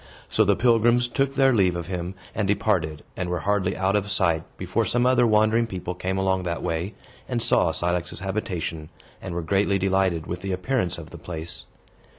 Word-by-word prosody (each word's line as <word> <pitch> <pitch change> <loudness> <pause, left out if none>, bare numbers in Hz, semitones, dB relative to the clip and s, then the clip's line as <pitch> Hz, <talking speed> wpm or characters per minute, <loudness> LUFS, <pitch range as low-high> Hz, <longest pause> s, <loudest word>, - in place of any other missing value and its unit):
So 110 - +3
the 100 -1 +3
pilgrims 120 +1 +3
took 135 +2 0
their 135 -1 +5
leave 95 -5 +3
of 85 -1 -4
him, 90 +1 -4 0.2
and 105 -2 -1
departed, 95 -7 0
and 90 - -3
were 90 -1 -1
hardly 100 -1 0
out 95 +1 +1
of 105 0 0
sight 85 -5 +2 0.2
before 95 +5 0
some 120 +4 +1
other 125 -1 +4
wandering 110 +2 +3
people 90 -3 -4
came 95 +1 -3
along 95 -1 +1
that 85 -1 -3
way, 85 +5 -2 0.3
and 125 -2 0
saw 90 -6 +3
Cilix's 85 +2 -2
habitation, 90 -6 -3 0.3
and 90 -3 -5
were 85 - -2
greatly 100 +4 +2
delighted 95 -3 +1
with 90 +1 -5
the 95 0 -2
appearance 90 -1 -1
of 80 -2 -10
the 85 - -9
place. 80 -1 -5
95 Hz, 190 wpm, -25 LUFS, 85-110 Hz, 0.3 s, their